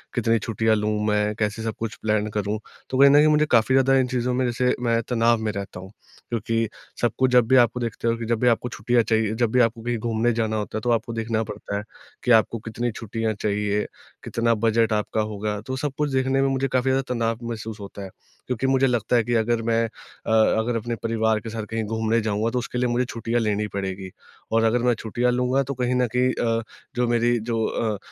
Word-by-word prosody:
कितनी 115 -2 +2
छुट्टियाँ 110 +1 +1
लूँ 105 0 0 0.2
मैं? 105 0 +1
कैसे 105 0 -2
सब 110 -1 -2
कुछ 115 -1 -4
प्लान 105 -1 +1
करूँ? 105 0 -2 0.3
तो 130 - -1
कहीं 140 +1 +8
न - - +5
कहीं 150 +1 +6
मुझे 150 0 +4
काफ़ी 120 +2 +4
ज़्यादा 135 0 +4
इन 130 - +1
चीज़ों 125 0 -1
में 130 +1 +1
जैसे 125 +1 +1
मैं 115 -1 +2
तनाव 115 -1 +3
में 110 -1 -1
रहता 100 -2 -6
हूँ, 95 +1 -10 0.4
क्योंकि 115 0 -1 0.3
सब 120 - +2
कुछ 130 -1 +2
जब 125 -2 +5
भी 130 - +4
आपको 120 -1 +4
देखते 115 -1 -3
हो 115 - +2
कि, 115 - -5
जब 115 0 0
भी 125 - +2
आपको 120 +1 +2
छुट्टियाँ 120 +1 +1
चाहिए 110 -1 +1
जब 115 -1 +1
भी 125 - +3
आपको 115 0 +1
कहीं 120 +1 -2
घूमने 115 +1 0
जाना 110 -1 -1
होता 105 0 -3
है - - -3
तो 120 - -2
आपको 115 0 0
देखना 115 0 -1
पड़ता 100 -1 -5
है 100 - -4 0.4
कि 125 - +1
आपको 115 0 +4
कितनी 115 +2 -3
छुट्टियाँ 115 0 -3
चाहिए, 105 0 -1 0.4
कितना 115 0 +1
बजट 115 0 +2
आपका 105 +1 0
होगा? 105 0 -3
तो 130 +4 -5
सब 145 +2 -2
कुछ 150 -1 0
देखने 135 0 +1
में 135 - +3
मुझे 135 0 0
काफ़ी 130 0 0
ज़्यादा 135 +1 +2
तनाव 115 -1 -1
महसूस 110 -1 -6
होता 100 0 -9
है। 95 - -7 0.4
क्योंकि 125 +1 -1
मुझे 135 0 +3
लगता 120 -1 0
है 120 - +4
कि 120 - -2
अगर 115 +1 +1
मैं 115 0 +1
अ, 110 - -9
अगर 110 +1 +3
अपने 120 +1 -3
परिवार 110 -1 +1
के 115 +1 -8
साथ 110 0 -4
कहीं 115 0 -2
घूमने 110 +1 0
जाऊँगा 110 +1 0
तो 125 - 0
उसके 125 0 -5
लिए 125 0 +1
मुझे 120 +1 +1
छुट्टियाँ 115 0 -2
लेनी 105 -1 0
पड़ेगी। 95 -1 -4 0.4
और 115 0 +3
अगर 115 +2 +3
मैं 125 -1 +4
छुट्टियाँ 120 +2 0
लूँगा 125 +2 +1
तो 140 +1 -4
कहीं 125 -1 -1
न 125 0 +2
कहीं 125 +1 +3
अ, 115 -1 0 0.3
जो 125 0 +1
मेरी 120 0 +2
जो 115 0 -2
अ, 110 -2 -1
115 Hz, 235 wpm, -24 LUFS, 110-125 Hz, 0.4 s, कहीं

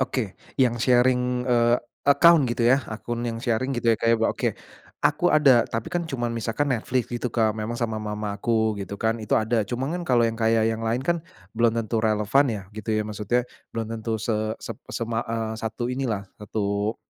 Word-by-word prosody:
Oke, 125 -6 -1 0.2
yang 125 -3 +3
sharing, 125 0 +2
eee, 120 -1 +4 0.3
account 160 +2 +7
gitu 120 0 0
ya, 135 +3 +5
akun 120 +2 -4
yang 115 0 -4
sharing, 120 +1 -1
gitu 115 -1 +3
ya, - - +1
Kak, 115 - +1
ya, 115 - +5
bo 115 - +2
oke, - - -2 0.5
aku - - +3
ada, 135 -6 +6
tapi 115 0 -3
kan 175 - 0
cuman 120 -4 -2
misalkan 115 +5 -1
Netflix 120 +2 -1
gitu, 120 +1 -2
Kak, 110 -2 +1
memang 110 +2 -4
sama 110 -2 -2
mama 105 -1 -3
aku, 110 +1 +1
gitu 100 +1 -6
kan, 110 +1 0
itu 105 - +1
ada. 110 0 +1
Cuman 130 +6 -2
kan - - -5
kalau 120 -2 +4
yang 115 - -1
kayak 115 0 +3
yang 115 0 -1
lain 115 +2 0
kan 170 0 0 0.3
belum 115 0 +2
tentu 115 0 -1
relevan 110 +5 +3
ya, 105 -3 -4
gitu 110 0 -5
ya. 110 - +1
Maksudnya 110 +3 -1 0.3
belum 115 -1 -3
tentu 110 0 -3
se 110 +1 -1 0.2
sep - - -7
sema 115 -1 -2
eee, 115 -1 -2
satu 110 +2 -3
ini 135 +1 -2
lah, 100 -3 -2 0.2
satu, 105 +1 -2
115 Hz, 205 wpm, -25 LUFS, 110-125 Hz, 0.5 s, account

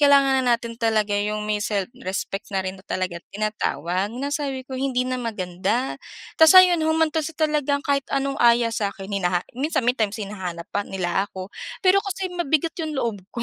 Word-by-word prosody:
kailangan 275 -2 +5
na 245 -2 +3
natin 235 0 -7
talaga 215 -2 +1
'yong 210 +1 -1
may 210 -1 -1
self-respect 195 0 -3
na 195 -2 -2
rin 190 0 -5
talaga 185 -2 -2
tinatawag," 195 -3 -1
na 280 +2 -3
sabi 275 -3 -2
ko, 260 - -11
"hindi 260 -1 0
na 255 0 -2
maganda." 210 +2 -2 0.4
Tapos 320 +3 +9
ayun 360 -3 +8
humantong 315 0 +1
sa 325 - -13
talagang 295 -2 +1
kahit 280 -2 0
anong 275 0 -1
aya 235 -1 +4
sa 210 -2 0
akin 195 -1 -9
hinaha 180 -2 0
minsan 265 0 -1
may 245 - +4
times 220 -3 -1
hinahanap 190 -5 -5
pa 205 - +1
nila 190 +1 -1
ako 190 +1 -8 0.3
pero 375 +2 +6
kasi 385 -2 -4
mabigat 330 -2 0
'yong 315 -2 -3
loob 230 -6 -1 0.2
ko 235 - -2
235 Hz, 185 wpm, -23 LUFS, 200-285 Hz, 0.4 s, Tapos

